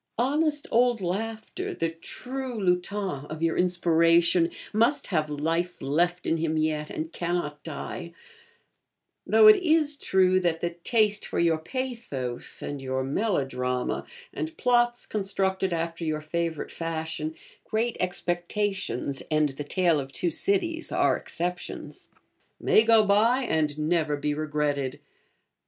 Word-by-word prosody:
Honest 295 +4 +1
old 240 0 +3
Laughter, 225 - -3
the 165 0 -1
true 250 +8 -6
lutin 180 -4 -1
of 155 +1 -6
your 165 - +2
inspiration, 170 -1 +3 0.2
must 235 +7 +2
have 155 -2 +1
life 165 +4 -1
left 175 +6 0
in 165 - +1
him 160 -1 -1
yet, 155 -1 0
and 160 +1 -5
cannot 170 -4 -2
die; 170 +2 -6 1.2
though 435 - +6
it 430 -1 +10
is 315 -5 +2
true 185 -7 +3
that 170 -3 0
the 175 - -1
taste 210 +4 +1
for - - -4
your 165 -2 +3
pathos, 160 - -4
and 145 -1 -5
your 130 0 -2
melodrama, 135 - -1 0.3
and 320 0 -5
plots 240 -1 +2
constructed 195 -2 -1
after 165 0 -2
your 155 -1 -1
favourite 160 0 -3
fashion 160 -1 -4 0.3
('Great 225 +2 -1
Expectations' 180 - -2
and 155 -1 +2
the 135 +2 -6
'Tale 170 0 +2
of 135 -1 -6
Two 175 +4 -1
Cities' 335 - -1
are - - +3
exceptions) 175 +1 -5 0.5
may - - +5
go 225 -1 +5
by 225 +6 +3
and 150 - 0
never 155 -1 +1
be 145 +1 -1
regretted. 145 -3 -1
175 Hz, 130 wpm, -27 LUFS, 155-220 Hz, 1.2 s, it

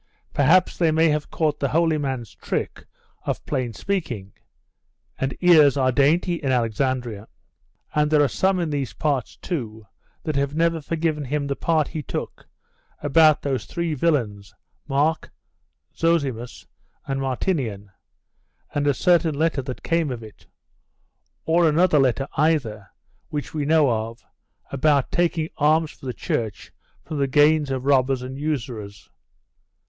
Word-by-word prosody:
Perhaps 165 +7 +3
they 170 -2 +3
may 160 +1 +3
have 150 -1 -1
caught 155 -2 -1
the 140 - +1
holy 160 +1 +2
man's 130 -5 -4
trick - - -4 0.4
of - - -3
plain 125 -3 -2
speaking 120 - -4 0.9
and 135 0 -2
ears 155 -6 +6
are 130 -1 +2
dainty 160 +7 +2
in 135 -3 0
Alexandria. 120 -2 -1 0.7
And 150 0 +2
there 150 -1 +4
are - - +3
some 190 +7 +1
in 165 -3 -1
these 135 -7 -2
parts, 140 +1 -1
too, 110 - -5 0.4
that 155 -3 -3
have 140 +1 0
never 165 0 +1
forgiven 155 -1 -2
him 145 +2 -2
the 140 0 -2
part 160 -1 +1
he 155 - -4
took - - -6 0.6
about 155 +1 +4
those 135 -3 -2
three 170 -2 -3
villains, 120 -10 -1 0.3
Marc, 150 +3 0 0.7
Zosimus, 140 -8 -1 0.4
and 135 0 -2
Martinian, 125 - -2 0.8
and 145 0 0
a 145 - +3
certain 170 -2 +3
letter 155 -1 +1
that 130 -1 -7
came 165 -2 +1
of 120 -3 -5
it; 110 -1 -14 1.0
or 165 0 +4
another 155 0 +3
letter 135 0 +1
either, 130 - 0 0.4
which 145 -1 -5
we 150 -2 -2
know 155 -3 +4
of, 115 +1 -4 0.5
about 140 0 +2
taking 165 -2 0
alms 155 +1 +2
for 135 - -12
the - - -1
church 110 -2 -4 0.3
from 155 - -5
the 140 - +2
gains 150 +1 +4
of 130 -1 -3
robbers 135 -2 +2
and 130 +2 -7
usurers. 120 -9 -4
145 Hz, 145 wpm, -23 LUFS, 130-160 Hz, 1.0 s, ears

